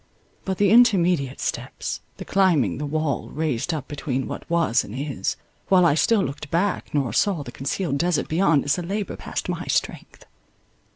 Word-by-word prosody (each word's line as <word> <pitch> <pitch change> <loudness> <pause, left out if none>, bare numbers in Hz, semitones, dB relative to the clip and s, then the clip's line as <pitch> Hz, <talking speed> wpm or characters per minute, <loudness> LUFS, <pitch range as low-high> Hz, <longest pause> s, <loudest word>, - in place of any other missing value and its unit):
But 190 -1 -2
the 200 -1 +3
intermediate 180 - +4
steps, - - -4 0.2
the - - -7
climbing 160 - +2
the 150 - -3
wall, 155 -1 -2
raised 150 -1 -1
up 150 -4 -4
between 135 -3 -3
what - - -7
was 165 -9 +2
and 105 - -9
is, 135 -8 -2 0.3
while 185 -2 +5
I 165 - +5
still 200 +7 +3
looked 145 -1 -5
back 180 +5 0
nor 140 -5 0
saw 190 -8 +1
the 120 - -9
concealed 140 +3 -2
desert 170 -2 +1
beyond, 160 -3 +2
is 145 +5 +1
a - - -2
labour 195 +4 -3
past - - -5
my - - -3
strength. - - -2
155 Hz, 175 wpm, -23 LUFS, 140-185 Hz, 0.3 s, while